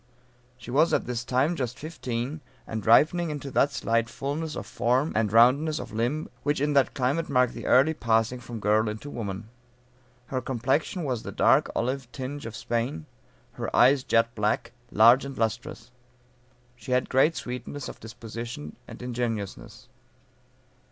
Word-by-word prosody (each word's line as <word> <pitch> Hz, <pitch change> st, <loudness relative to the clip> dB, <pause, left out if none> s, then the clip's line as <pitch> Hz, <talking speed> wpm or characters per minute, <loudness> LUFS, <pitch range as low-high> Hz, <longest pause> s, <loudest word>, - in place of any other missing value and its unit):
She 120 Hz, 0 st, -9 dB
was 155 Hz, +6 st, +4 dB
at -, -, -1 dB
this 120 Hz, -1 st, -3 dB
time 135 Hz, +7 st, +1 dB
just 125 Hz, -5 st, -3 dB
fifteen, 140 Hz, -2 st, -4 dB, 0.2 s
and 110 Hz, -2 st, -5 dB
ripening 160 Hz, -, +4 dB
into 145 Hz, -2 st, -5 dB
that 140 Hz, +2 st, +3 dB
slight 115 Hz, -2 st, 0 dB
fullness 150 Hz, +5 st, -4 dB
of -, -, -5 dB
form, 125 Hz, +7 st, 0 dB
and 105 Hz, -2 st, +1 dB
roundness 135 Hz, +7 st, +5 dB
of -, -, -6 dB
limb, 120 Hz, +8 st, -1 dB
which 145 Hz, -1 st, 0 dB
in 145 Hz, +1 st, +1 dB
that 140 Hz, -2 st, +3 dB
climate 140 Hz, +6 st, 0 dB
mark 125 Hz, -3 st, +3 dB
the -, -, -7 dB
early 140 Hz, +5 st, +5 dB
passing 115 Hz, -2 st, +1 dB
from 120 Hz, -1 st, -8 dB
girl 105 Hz, +1 st, +2 dB
into 110 Hz, +7 st, -7 dB
woman. 105 Hz, -3 st, -5 dB, 0.8 s
Her 130 Hz, +1 st, -3 dB
complexion 135 Hz, -, -1 dB
was 125 Hz, -6 st, -2 dB
the -, -, -7 dB
dark -, -, +3 dB
olive 125 Hz, 0 st, -2 dB
tinge 135 Hz, +2 st, -6 dB
of 115 Hz, -, -8 dB
Spain; 115 Hz, -9 st, -2 dB, 0.5 s
her -, -, -4 dB
eyes 130 Hz, +2 st, +5 dB
jet 115 Hz, -1 st, +2 dB
black, 105 Hz, +1 st, -1 dB, 0.2 s
large 120 Hz, +5 st, +6 dB
and 140 Hz, -1 st, -7 dB
lustrous. 115 Hz, +1 st, -3 dB, 0.8 s
She 125 Hz, +1 st, -5 dB
had 125 Hz, -, +2 dB
great 145 Hz, +5 st, +3 dB
sweetness 125 Hz, +3 st, -6 dB
of -, -, -9 dB
disposition 115 Hz, -7 st, -8 dB
and -, -, -10 dB
ingenuousness. 115 Hz, -, -4 dB
125 Hz, 160 wpm, -26 LUFS, 115-140 Hz, 0.8 s, large